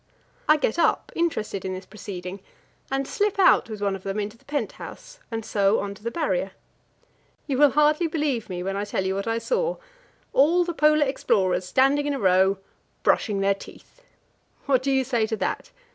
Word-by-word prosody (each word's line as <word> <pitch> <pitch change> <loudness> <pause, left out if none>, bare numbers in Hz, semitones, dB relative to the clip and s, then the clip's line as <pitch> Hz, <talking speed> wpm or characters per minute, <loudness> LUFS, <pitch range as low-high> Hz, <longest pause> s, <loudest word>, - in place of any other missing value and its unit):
I 305 - +7
get 295 +1 -1
up, 335 - +2
interested 215 - -1
in 185 0 -3
this 185 - -8
proceeding, 190 -2 -7 0.5
and 270 0 -1
slip 410 -1 0
out 370 -9 +5
with 215 -2 -7
one 200 -1 +1
of 190 - -9
them 195 +2 -3
into 210 +1 -4
the - - -27
pent 280 -8 -2
house - - -11
and 225 -2 -4
so 200 +1 +2
on 200 0 -4
to 200 - -16
the 230 - -2
Barrier. 340 - -1 0.9
You 270 -3 -1
will 290 -1 +7
hardly 300 +4 +3
believe 295 -9 -1
me, 180 -1 -4
when 195 +1 -2
I 200 - -1
tell 195 -2 -2
you 190 - 0
what 195 +3 -3
I 225 0 0
saw - - -1 0.6
all 335 +6 +4
the 345 - -3
Polar 305 -1 +4
explorers 190 -9 +1
standing 275 +8 +3
in 290 - 0
a - - -4
row, 190 0 +3 0.5
brushing 205 -3 +2
their 200 0 +3
teeth! 195 - -14 0.6
What 265 -3 +3
do 275 - -1
you 265 -1 +3
say 240 -4 0
to 220 - -2
that? - - -3
230 Hz, 200 wpm, -25 LUFS, 200-295 Hz, 0.9 s, I